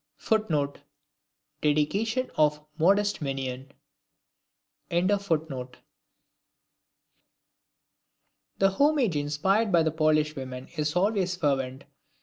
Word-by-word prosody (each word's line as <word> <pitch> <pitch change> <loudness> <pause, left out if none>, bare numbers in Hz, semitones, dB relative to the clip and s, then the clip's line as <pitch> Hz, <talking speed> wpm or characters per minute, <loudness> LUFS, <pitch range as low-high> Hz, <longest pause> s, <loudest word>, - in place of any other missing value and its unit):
[Footnote: 160 -11 0 0.8
Dedication 200 - 0
of 150 0 +2
"Modeste 200 +3 +3
Mignon".] 135 -1 -4 1.2
The 165 -8 -1 2.9
homage 240 - +3
inspired 170 +9 +1
by 170 -2 +4
the 160 - +1
Polish 155 -1 +2
women 130 -1 -7
is 150 0 -1
always 190 -1 +1
fervent. 135 -5 -1
155 Hz, 75 wpm, -27 LUFS, 145-195 Hz, 2.9 s, by